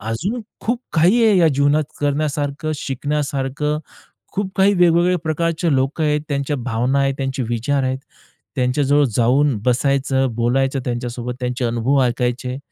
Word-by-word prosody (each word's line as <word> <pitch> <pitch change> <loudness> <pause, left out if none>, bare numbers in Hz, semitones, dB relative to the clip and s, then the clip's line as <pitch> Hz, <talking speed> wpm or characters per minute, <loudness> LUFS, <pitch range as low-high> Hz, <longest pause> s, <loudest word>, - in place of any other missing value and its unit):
अजून 155 - -3 0.2
खूप 240 +2 -1
काही 185 +9 +4
आहे 210 -3 +5
या 165 -2 +5
जीवनात 145 +2 +3 0.2
करण्यासारखं, 145 +1 -1
शिकण्यासारखं. 145 +1 -2 0.5
खूप 200 -1 -2
काही 195 +1 +4
वेगवेगळ्या 175 0 +3
प्रकारचे 165 0 0
लोकं 135 +4 0
आहेत, 150 0 +1
त्यांच्या 140 0 -1
भावना 125 +2 0
आहेत, 135 -1 +1
त्यांचे 135 -1 -2
विचार 125 +4 0
आहेत, 130 0 -1 0.6
त्यांच्याजवळ 140 +3 +2
जाऊन 130 +2 +3
बसायचं, 135 +1 +1
बोलायचं 135 +3 +1
त्यांच्यासोबत, 120 0 -3
त्यांचे 125 0 -2
अनुभव 120 +4 +1
ऐकायचे 125 +1 -1
140 Hz, 130 wpm, -20 LUFS, 125-155 Hz, 0.6 s, आहे